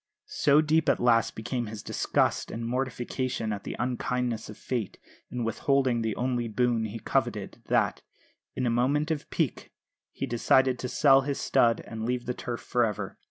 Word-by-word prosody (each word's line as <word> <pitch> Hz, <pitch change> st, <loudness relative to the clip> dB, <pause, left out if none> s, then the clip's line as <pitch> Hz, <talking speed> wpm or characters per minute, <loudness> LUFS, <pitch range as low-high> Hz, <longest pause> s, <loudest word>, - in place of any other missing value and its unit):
So 145 Hz, +1 st, +3 dB
deep 155 Hz, +1 st, +2 dB
at -, -, +3 dB
last 115 Hz, -2 st, +3 dB
became 120 Hz, +1 st, -3 dB
his 105 Hz, -1 st, -7 dB
disgust -, -, 0 dB
and 115 Hz, +1 st, -4 dB
mortification 125 Hz, -2 st, -2 dB
at 100 Hz, -, -7 dB
the -, -, -4 dB
unkindness 125 Hz, -2 st, -2 dB
of 105 Hz, -, -9 dB
Fate 120 Hz, -7 st, -3 dB, 0.3 s
in 125 Hz, -1 st, -3 dB
withholding 125 Hz, +1 st, +1 dB
the 110 Hz, -2 st, -1 dB
only 125 Hz, -1 st, -1 dB
boon 115 Hz, 0 st, +1 dB
he 110 Hz, +1 st, -5 dB
coveted -, -, -2 dB
that, -, -, +1 dB, 0.5 s
in 130 Hz, -, -1 dB
a 120 Hz, -, +2 dB
moment 140 Hz, +6 st, +1 dB
of 150 Hz, -3 st, -3 dB
pique, -, -, -2 dB, 0.4 s
he -, -, -4 dB
decided 125 Hz, +2 st, +3 dB
to 125 Hz, -, -3 dB
sell 135 Hz, -1 st, +5 dB
his 140 Hz, 0 st, -3 dB
stud 115 Hz, -1 st, +3 dB
and 110 Hz, -1 st, -7 dB
leave 125 Hz, +1 st, -1 dB
the 125 Hz, -, -1 dB
turf 120 Hz, -1 st, -5 dB
for 120 Hz, -, +1 dB
ever. 105 Hz, -3 st, -3 dB
120 Hz, 175 wpm, -28 LUFS, 115-130 Hz, 0.5 s, sell